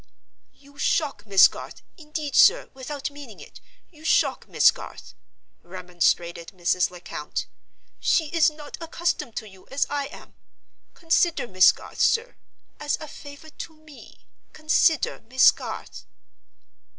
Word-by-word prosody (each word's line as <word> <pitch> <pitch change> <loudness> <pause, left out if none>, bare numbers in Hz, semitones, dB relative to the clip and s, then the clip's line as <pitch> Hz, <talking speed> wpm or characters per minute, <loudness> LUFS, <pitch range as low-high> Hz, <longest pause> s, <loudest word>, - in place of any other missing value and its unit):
"You 280 0 -20
shock 275 -11 -1
Miss 195 -2 +7
Garth; - - -11
indeed, 305 -3 -6
sir, - - +5
without 280 +2 -6
meaning 285 -7 -12
it, - - -14 0.3
you 310 -2 -18
shock 320 - +1
Miss - - +5
Garth," - - -11 0.5
remonstrated 175 -1 -1
Mrs. 180 0 +1
Lecount. 175 -4 -6 0.5
"She 320 -3 +1
is 330 0 +3
not 300 -1 -11
accustomed 330 -6 -2
to 215 - -5
you 190 -2 -17
as 275 +1 0
I 285 -1 -2
am. 290 - -14 0.6
Consider 330 -4 +1
Miss 185 -2 +6
Garth, - - -13
sir. 475 +2 +2 0.4
As 295 -1 -1
a 310 - -8
favor 285 +2 -12
to 320 +1 -9
me, 310 -2 -16 0.3
consider 310 0 +1
Miss 260 +1 +6
Garth." - - -8
285 Hz, 130 wpm, -24 LUFS, 200-310 Hz, 0.6 s, Miss